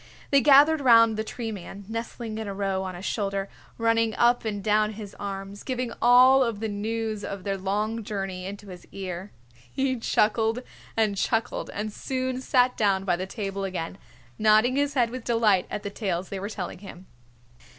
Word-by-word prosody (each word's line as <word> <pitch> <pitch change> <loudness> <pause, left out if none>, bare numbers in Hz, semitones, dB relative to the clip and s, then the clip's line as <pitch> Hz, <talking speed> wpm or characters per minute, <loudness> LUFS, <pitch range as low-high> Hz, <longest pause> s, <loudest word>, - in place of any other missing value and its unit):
They 280 -1 +6
gathered 290 +2 +6
around 230 -3 +6
the 215 - -2
Tree 225 0 -5
Man, 200 0 -8
nestling 230 0 -5
in 220 - -4
a 200 - -5
row 195 -1 -1
on 185 -1 -5
his 180 +3 -8
shoulder, 200 -2 -2 0.3
running 230 -1 +2
up 240 0 +3
and 205 -2 -3
down 215 +1 +2
his 210 -1 -9
arms, 195 0 -6
giving 255 -2 -3
all 255 +2 +7
of 230 -4 -2
the 220 - -2
news 215 0 -3
of 200 -2 -5
their 195 0 -1
long 210 +4 -2
journey 195 -3 -4
into 200 0 -8
his 180 -1 -11
ear. 190 0 -6 0.4
He 265 -2 -1
chuckled 225 +2 +1 0.3
and 215 -3 +2
chuckled 225 +4 -1
and 210 +1 -4
soon 260 +1 -3
sat 250 -1 +3
down 195 -3 +1
by 180 - +2
the 185 +2 -4
table 195 -1 -4
again, 185 -1 -4 0.4
nodding 215 +4 +4
his 285 +1 0
head 240 -3 +2
with 255 -1 -6
delight 225 -6 +2
at 210 - -4
the 200 - -4
tales 190 -4 -3
they 195 - -4
were 200 +2 -4
telling 190 -5 -6
him. 190 -2 -11
215 Hz, 185 wpm, -26 LUFS, 195-235 Hz, 0.4 s, all